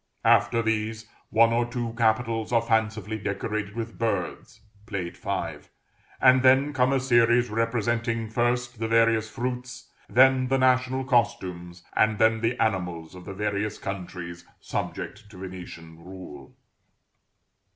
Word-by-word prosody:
After 115 - +4
these, 110 0 -2 0.2
one 115 +1 +4
or 120 +1 +2
two 120 -1 -4
capitals 115 0 +1
are 115 -1 +3
fancifully 110 -2 -1
decorated 100 +1 -3
with 115 -1 -6
birds 105 -6 -3 0.3
(Plate 95 -6 -4
V.), 95 -5 -3 0.6
and 130 0 +6
then 130 +3 +4
come 130 -1 +2
a 135 - +2
series 120 -2 +3
representing, 115 0 -1
first 120 +1 -1
the 115 - -1
various 115 -1 +3
fruits, 125 +1 -5 0.2
then 130 +1 +5
the 135 +1 +2
national 130 0 +2
costumes, 95 -9 -1
and 110 0 +3
then 110 +1 +3
the 115 +2 0
animals 90 -7 -1
of 90 -1 -11
the 100 - -6
various 105 +1 -2
countries 90 -3 -6 0.2
subject 105 0 -5
to 100 - -14
Venetian 85 -3 -9
rule. 90 -7 -11
115 Hz, 130 wpm, -26 LUFS, 100-120 Hz, 0.6 s, and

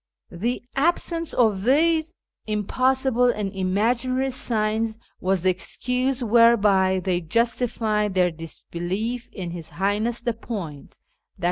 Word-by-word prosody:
The 235 +9 -2
absence 330 +2 0
of 215 -6 +2
these 320 - +2 0.3
impossible 255 +4 +1
and 210 -5 -1
imaginary 235 +8 0
signs 220 -2 -1 0.2
was 185 -1 0
the 185 - +4
excuse 250 +7 -1
whereby 210 -5 +4
they 180 -1 0
justified 215 +1 0
their 180 -1 +3
disbelief 175 +8 -5
in 180 -4 -6
His 170 -2 -7
Highness 210 +5 -1
the 235 0 -1
Point 195 - -7 0.4
{i. - - -28
220 Hz, 115 wpm, -24 LUFS, 190-250 Hz, 0.4 s, the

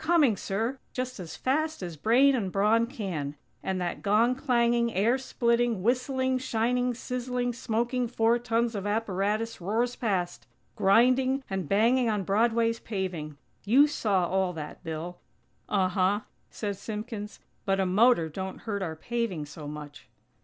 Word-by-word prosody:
Coming, 315 -8 +4
sir!! 225 +8 -2
Just 255 -3 -4
as 165 -4 -7
fast 310 -1 -1
as 175 -2 -5
brain 245 - +4
and 205 -8 -1
brawn 215 +4 +3
can! 175 - -4 0.3
And 190 -1 -2
that 175 -1 -3
gong 220 +5 +3
clanging, 235 -3 +2
air 230 +7 +3
splitting, 235 -5 +1
whistling, 260 +2 +1
shining, 245 0 0
sizzling, 250 0 -2
smoking 240 +2 -1
four 230 0 +2
tons 235 0 0
of 200 -1 -3
apparatus 210 +1 -1
roars 230 +7 0
past, 185 -6 -2 0.3
grinding 255 +6 +3
and 190 -5 -3
banging 235 +4 +3
on 210 -2 0
Broadway's 230 +3 +2
paving! 175 -8 -4 0.3
You 255 +8 +6
saw 205 -11 +1
all 190 0 0
that, 155 -3 -8
Bill." 165 +2 -5 0.5
"Uh 190 -3 +2
huh," 190 +2 +1 0.3
said 205 -3 -4
Simpkins, 215 0 -6 0.2
"but 195 -1 +1
a 190 - +2
motor 200 -1 +4
don't 190 +4 -6
hurt 205 -3 -3
our 165 -4 -3
paving 215 -3 -3
so 145 0 -9
much." 150 -1 -9
225 Hz, 145 wpm, -28 LUFS, 190-245 Hz, 0.5 s, You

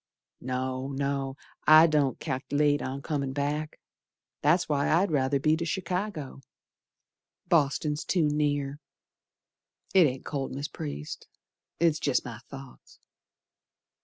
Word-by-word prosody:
No, 130 +1 -3
no, 140 -1 -2 0.3
I 155 +1 +9
don't 150 -4 +1
cal'late 145 +2 0
on 135 +1 -4
comin' 140 -4 -2
back, 145 +2 -2 0.6
That's 165 +5 +3
why 145 -2 +1
I'd 175 +3 +3
ruther 140 -1 +2
be 155 +3 +3
to 170 - -3
Chicago, 180 -4 -3 1.1
Boston's 150 -2 +1
too 175 -4 +1
near. 145 -1 0 1.1
It 185 -5 +7
ain't 130 0 -5
cold, 135 -3 -3
Mis' 140 +3 -4
Priest, 75 0 -6 0.5
It's 165 -2 +3
jest 140 -5 +1
my 115 -3 -7
thoughts. 135 -1 -12
145 Hz, 115 wpm, -28 LUFS, 135-155 Hz, 1.1 s, I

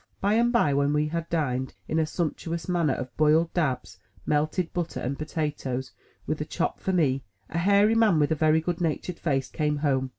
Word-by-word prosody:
By 200 +2 +2
and 235 +2 +3
by, 235 - +3
when 140 +1 +2
we 150 0 +1
had 170 +1 -3
dined 130 -6 -1
in 160 - 0
a 160 - +1
sumptuous 165 0 -3
manner 170 -6 +1
off 125 -1 -6
boiled 155 +2 +3
dabs, 135 -8 -1 0.3
melted 155 +4 0
butter, 175 -2 -3
and 130 +3 -2
potatoes, 145 -4 -3 0.3
with - - -2
a - - +1
chop - - -2
for 190 - -1
me, 140 -7 +1 0.3
a 165 - -1
hairy 200 +4 +4
man 225 -6 +4
with 145 0 +2
a - - +3
very 155 +1 +3
good 175 +2 -3
natured 170 +1 -2
face, 135 -5 0
came 150 -1 -1
home. 135 -2 +1
155 Hz, 200 wpm, -26 LUFS, 145-175 Hz, 0.3 s, hairy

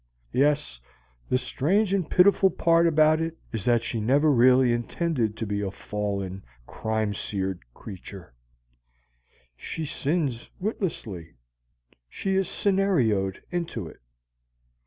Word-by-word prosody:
Yes, 145 - +1 0.5
the 125 - +3
strange 180 +11 0
and 185 -5 0
pitiful 190 +1 +5
part 170 -1 +3
about 155 0 +4
it 165 0 -3 0.2
is 110 -4 -3
that 120 -1 +3
she 115 - -3
really 110 - -3
never 130 -2 +5
intended 120 -1 -1
to 115 - -3
be 100 0 -2
a 100 - -2
fallen, 100 -1 -4 0.2
crime 110 - -2
seared 95 -3 -3 0.2
creature. 95 - -10 1.2
She 160 - -5
sins 145 -4 -2
witlessly: 115 - -4 0.7
she 195 - -2
is 190 -1 +1
scenarioed 130 - +1
into 170 - -3
it. - - -13
125 Hz, 115 wpm, -26 LUFS, 105-165 Hz, 1.2 s, pitiful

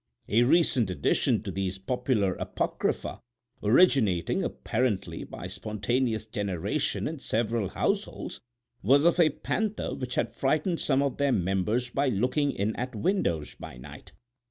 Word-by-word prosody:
A 110 +3 +4
recent 125 - +3
addition 110 +4 +1
to 100 - -4
these 95 0 -2
popular 110 -2 0
apocrypha, - - -2 0.4
originating, 110 - +3
apparently, 105 -8 -1
by - - -8
spontaneous 110 +2 -1
generation 100 - -2
in 155 -1 -5
several 115 -5 -1
households, 200 - -2 0.4
was 140 +4 +4
of 170 +1 +4
a 165 -2 +6
panther 215 +8 -2
which 125 -2 -4
had 115 - 0
frightened 155 +5 0
some 135 -1 +2
of 140 - -1
their 140 -1 +2
members 100 +5 0
by 140 +2 +1
looking 130 +7 +1
in 105 -2 -1
at 125 0 -4
windows 105 - 0
by 65 - -10
night. 60 - -11
120 Hz, 135 wpm, -28 LUFS, 100-140 Hz, 0.4 s, a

